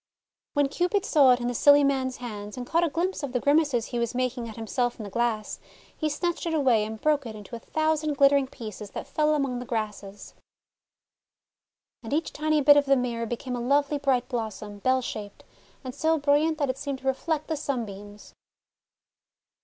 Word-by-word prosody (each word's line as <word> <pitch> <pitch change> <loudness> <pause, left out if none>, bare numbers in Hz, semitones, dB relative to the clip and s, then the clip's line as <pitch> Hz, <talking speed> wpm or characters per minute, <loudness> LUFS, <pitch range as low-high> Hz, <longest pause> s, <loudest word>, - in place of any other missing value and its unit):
When 290 -2 +2
Cupid 360 +7 0
saw 280 -8 +5
it 245 - 0
in 240 - -2
the 245 - -1
silly 285 +4 +6
man's 265 -2 0
hands, 210 -3 -7
and 250 - -5
caught 335 +6 +1
a 340 - +2
glimpse 345 +5 -2
of 280 -4 -5
the 250 - +1
grimaces 285 -4 +2
he 240 - -4
was 235 +1 -2
making 250 -2 -2
at 220 - -9
himself 240 +2 -2
in - - -5
the 200 - -8
glass, 230 -1 -1 0.4
he 310 - -1
snatched 345 +3 -2
it 325 - 0
away, 250 -8 +3
and 220 0 -7
broke 295 -1 +1
it 220 - -7
into 210 +3 -9
a - - -7
thousand 310 +1 -1
glittering 275 -1 +5
pieces 215 -5 -8
that - - -5
fell 305 0 +1
among 270 -4 -1
the 250 - -6
grasses. 210 -4 -5 1.7
And 235 +3 -6
each 315 +2 -1
tiny 305 0 +1
bit 290 +1 +7
of 285 - +4
the 275 0 +4
mirror 235 -2 -2
became 250 +2 -4
a 240 - -4
lovely 285 +3 +1
bright 265 -3 +1
blossom, 215 -4 -5
bell 255 +4 +1
shaped, 205 -3 -7 0.4
and 255 -1 -6
so 320 +3 +1
bril 285 0 +4
liant 320 -1 -2
that 285 -3 +1
it 260 - -12
seemed 280 -1 -3
to - - -15
reflect 305 +3 -1
the 320 - -2
sunbeams. 210 -8 -6
260 Hz, 200 wpm, -26 LUFS, 230-290 Hz, 1.7 s, bit